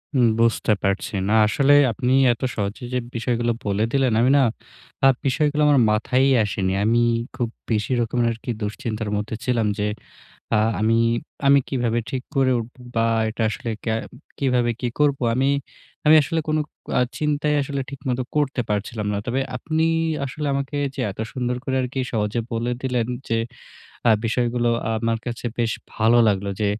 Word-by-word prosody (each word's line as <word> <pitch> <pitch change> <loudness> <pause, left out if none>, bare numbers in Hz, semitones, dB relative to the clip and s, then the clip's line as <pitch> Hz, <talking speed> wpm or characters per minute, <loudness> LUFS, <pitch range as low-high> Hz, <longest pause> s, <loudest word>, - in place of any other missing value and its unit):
হুম, 125 -3 +5
বুঝতে 115 -2 +3
পারছি। 100 +1 -1 0.2
না - - +2
আসলেই 145 +4 +5
আপনি 125 +3 0 0.2
এত 120 - -13
সহজে 100 +4 -3
যে 125 - +1 0.2
বিষয়গুলো 120 0 0
বলে 100 +1 0
দিলেন, 135 -4 +2
আমি 125 - +4
না - - +5 0.6
আ - - +9 0.2
বিষয়গুলো 150 +2 +1
আমার 145 -2 +5
মাথায়ই 130 +5 +2
আসেনি। 95 -2 -1
আমি 115 +3 +3 0.4
খুব 120 -3 -1 0.2
বেশি 105 +2 0
রকমের 120 +1 0
আরকি 115 +2 -8
দুশ্চিন্তার 110 +1 -3
মধ্যে 105 +2 -3
ছিলাম 120 -4 +1
যে, 105 - +1 0.7
আ - - +4 0.2
আমি 110 +2 +3 0.5
আমি 140 0 +7
কিভাবে 120 -3 0
ঠিক 130 -1 -3
করে 135 -1 +3
উঠবো? 120 +3 -9 0.2
বা 115 0 +2 0.2
এটা 115 - -5
আসলে 115 - -5 0.2
ক্যা 110 - +1 0.4
কিভাবে 125 -3 +2
কি 125 - 0
করবো? 140 -2 +2
আমি 135 +2 +2 0.6
আমি 155 +1 +7
আসলে 165 +3 -1
কোনো 155 0 +1 0.4
আ - - +4 0.2
চিন্তাই 150 0 0
আসলে 140 0 -3
ঠিকমত 135 -2 -3 0.2
করতে 140 -4 +1
পারছিলাম 105 +1 -2
না। - - -1
তবে 130 +3 0 0.2
আপনি 160 +5 -1 0.4
আসলে 145 +3 -4
আমাকে 140 +1 -2 0.2
যে - - -8
এত - - -15
সুন্দর 125 -2 -1
করে 130 -2 -2
আরকি 130 +1 -3
সহজে 105 0 -1
বলে 115 +1 -1
দিলেন 125 -3 0 0.2
যে 115 - +1 0.7
আ - - +7
বিষয়গুলো 120 +1 +1 0.3
আমার 115 0 0
কাছে 120 0 -5
বেশ 115 -1 +1 0.2
ভালো 115 +2 +3
লাগলো 100 -1 +1
যে, - - +2
120 Hz, 165 wpm, -22 LUFS, 110-135 Hz, 0.7 s, আ